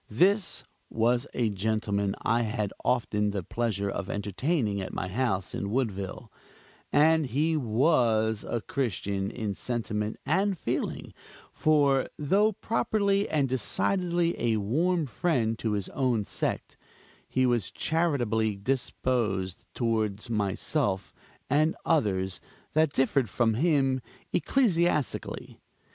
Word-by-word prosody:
This 185 - +2 0.3
was 120 +4 +1
a 115 -3 +1
gentleman 100 -1 -1
I 115 +1 +2
had 105 -3 -2
often 105 -4 +1
the 100 -2 -3
pleasure 105 0 -1
of 100 -1 -3
entertaining 105 - -1
at 95 - -6
my 90 - -2
house 100 -2 -1
in 100 - -3
Woodville; 100 -6 -3 0.6
and 155 0 +4
he 155 +6 +1
was 115 -5 +2
a 115 - -2
Christian 100 - -2
in 110 -3 -3
sentiment 110 -1 -2
and 190 +4 +1
feeling; - - -3 0.4
for 140 -4 +3
though 200 +9 +3
properly 200 -1 0
and 145 -3 +2
decidedly 170 - +1
a 115 -2 +2
warm 160 - +1
friend 115 - 0
to 110 -2 -1
his 100 -2 -1
own 125 -5 0
sect, - - -3 0.5
he 130 0 +2
was 120 -6 +1
charitably 120 -10 0
disposed 110 -4 -1
toward 110 -3 -1
myself 105 +1 0 0.3
and 155 +2 +2
others 95 - +1 0.3
that 155 -1 +3
differed 135 -3 +2
from 115 +4 +2
him 135 -1 +2 0.3
ecclesiastically. 175 - 0
120 Hz, 115 wpm, -28 LUFS, 105-150 Hz, 0.6 s, and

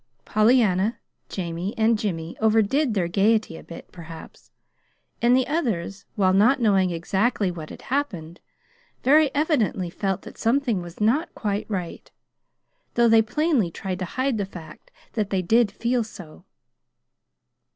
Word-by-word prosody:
Pollyanna, 215 -2 +3 0.3
Jamie, 175 +2 -4
and 225 +1 +3
Jimmy 170 -6 -3
overdid 220 +4 +2
their 180 -4 +1
gayety 205 0 +1
a - - -9
bit, 170 - -11
perhaps; 165 -2 -12 0.7
and 245 +2 +5
the 260 - +2
others, 215 - -2
while 185 -3 +3
not 235 +8 +4
knowing 195 -5 +3
exactly 190 +4 0
what 160 -3 -8
had - - -11
happened, 185 - -3 0.6
very 300 +2 +5
evidently 240 - 0
felt 195 0 -2
that - - -12
something 235 -4 +1
was 175 0 -10
not 245 +11 +1
quite 205 -2 -3
right, 180 -5 -5 0.9
though 235 0 +4
they 225 -1 +6
plainly 275 - +1
tried 185 +2 -5
to 185 - -2
hide 260 +4 -1
the 200 - -1
fact 160 -5 -12 0.2
that 210 -3 -1
they 190 -2 0
did 225 +3 +3
feel 235 +3 0
so. 175 -5 -12
210 Hz, 140 wpm, -24 LUFS, 180-235 Hz, 0.9 s, they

